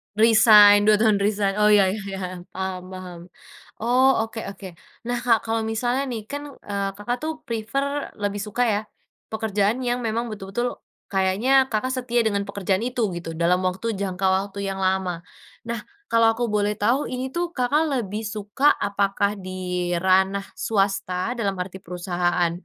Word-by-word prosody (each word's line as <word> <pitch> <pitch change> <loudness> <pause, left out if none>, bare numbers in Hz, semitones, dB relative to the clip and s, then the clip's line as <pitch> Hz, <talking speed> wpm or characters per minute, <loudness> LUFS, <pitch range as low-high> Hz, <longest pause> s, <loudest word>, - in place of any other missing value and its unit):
Resign, 215 -2 +7
2 210 0 +4
tahun 215 -3 +3
resign. 200 -1 +1
Oh 210 0 +4
iya 200 -2 +6
iya, 190 -2 -5
paham 185 -1 -5
paham, 185 -2 -8 0.6
oh 250 +4 +4 0.2
oke 225 0 -7
oke. 195 -1 -10 0.4
Nah 245 - 0
Kak 230 -3 +4
kalo 225 0 0
misalnya 240 +4 -1
nih, 220 -2 -5
kan, 285 +1 -5 0.2
eee, 200 -1 -1
Kakak 240 +4 -2
tuh 315 - -1 0.2
prefer, 275 +6 -2
lebih 205 0 -2
suka 215 +4 -1
ya, 210 -2 +1 0.5
pekerjaan 220 +1 0
yang 245 -1 -1
memang 230 +1 -1
betul-betul, 215 +3 -3 0.3
kayaknya 200 +8 +3
Kakak 255 +4 -1
setia 245 -1 0
dengan 200 -1 0
pekerjaan 200 0 -1
itu, 245 -2 0
gitu, 170 -1 -6
dalam 170 +3 +1
waktu 190 +5 -1
jangka 190 -1 -1
waktu 195 +1 -1
yang 195 0 -3
lama. 185 -2 0 0.4
Nah, 235 0 -4 0.3
kalau 230 -1 +5
aku 235 -1 -2
boleh 210 0 +1
tahu, 235 +8 +1
ini 255 +1 -4
tuh 345 +2 -3
Kakak 270 +5 +2 0.2
lebih 210 +3 -5
suka 210 +6 -1 0.2
apakah 200 0 0
di 180 -1 -3
ranah 190 +2 +2 0.2
swasta 195 -1 0
dalam 200 -3 0
arti 185 +1 -5
perusahaan 175 -1 -1
205 Hz, 155 wpm, -23 LUFS, 190-230 Hz, 0.6 s, Resign